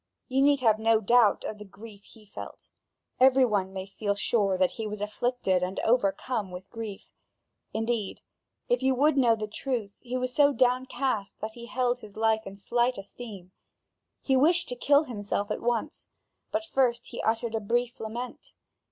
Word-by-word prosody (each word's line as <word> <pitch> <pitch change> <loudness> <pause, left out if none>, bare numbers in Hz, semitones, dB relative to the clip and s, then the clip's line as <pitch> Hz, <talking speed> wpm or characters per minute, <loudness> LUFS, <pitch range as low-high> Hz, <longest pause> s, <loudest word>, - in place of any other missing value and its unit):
You 265 0 +1
need 285 -1 +4
have 220 -3 +4
no 225 0 +4
doubt 225 0 +4
of 210 - -5
the - - -7
grief 205 0 -13
he 220 -2 -16
felt; 205 - -10 0.5
every 260 0 +6
one 200 -5 0
may 190 -1 -5
feel 200 +1 -2
sure 200 -2 +1
that 185 -1 +2
he 220 -2 -5
was 210 0 -5
afflicted 210 -2 0
and 180 +1 -2
overcome 220 -1 +1
with 180 +1 -9
grief. 220 -3 -7 0.6
Indeed, 225 -2 -2 0.5
if - - +1
you 265 0 +2
would 295 +4 +3
know 240 -4 +4
the 215 -1 -4
truth, 215 -2 -3
he 250 0 -4
was 255 0 -2
so 290 -1 +5
downcast 255 -4 0
that 215 +1 -3
he 235 +1 -10
held 250 0 0
his 215 -3 -13
life 220 -1 +1
in 195 - -8
slight 240 +5 0
esteem. 195 -2 -10 0.7
He 265 - +2
wished 325 +7 +3
to 245 - -3
kill 285 +4 +4
himself 205 -5 -3
at - - -2
once, 235 -2 -2 0.4
but 325 +1 -1
first 255 -6 +1
he 240 - -5
uttered 225 +1 0
a 225 - 0
brief 240 +4 -1
lament. 235 +3 -6
225 Hz, 180 wpm, -28 LUFS, 205-255 Hz, 0.7 s, every